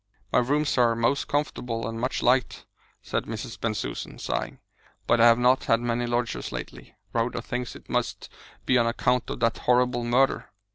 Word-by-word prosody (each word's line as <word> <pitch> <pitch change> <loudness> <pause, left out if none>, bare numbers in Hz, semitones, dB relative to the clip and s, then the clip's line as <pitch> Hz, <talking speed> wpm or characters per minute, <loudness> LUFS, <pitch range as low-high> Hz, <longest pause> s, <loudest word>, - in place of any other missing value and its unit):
"My - - +5
rooms 145 +3 +1
are 120 -1 +4
most 115 +5 +1
comfortable, 125 -6 -2
an' 115 0 -5
much 130 +3 -2
liked," 125 0 +2 0.4
said - - -2
Mrs. 115 +1 -6
Bensusan, 110 -2 -3
sighing, - - -3 0.5
"but 120 - +3
I 120 - +8
have 115 0 +6
not 125 +2 +3
had 115 - +3
many 120 0 -1
lodgers 120 0 -2
lately. - - -8 0.2
Rhoda 115 +1 0
thinks 125 0 -4
it - - -13
must - - -2 0.4
be 130 - +4
on 115 - +2
account 125 +1 0
of - - -5
that 115 -1 +1
horrible 125 -1 +2
murder." 125 +3 +2
120 Hz, 175 wpm, -26 LUFS, 115-125 Hz, 0.5 s, I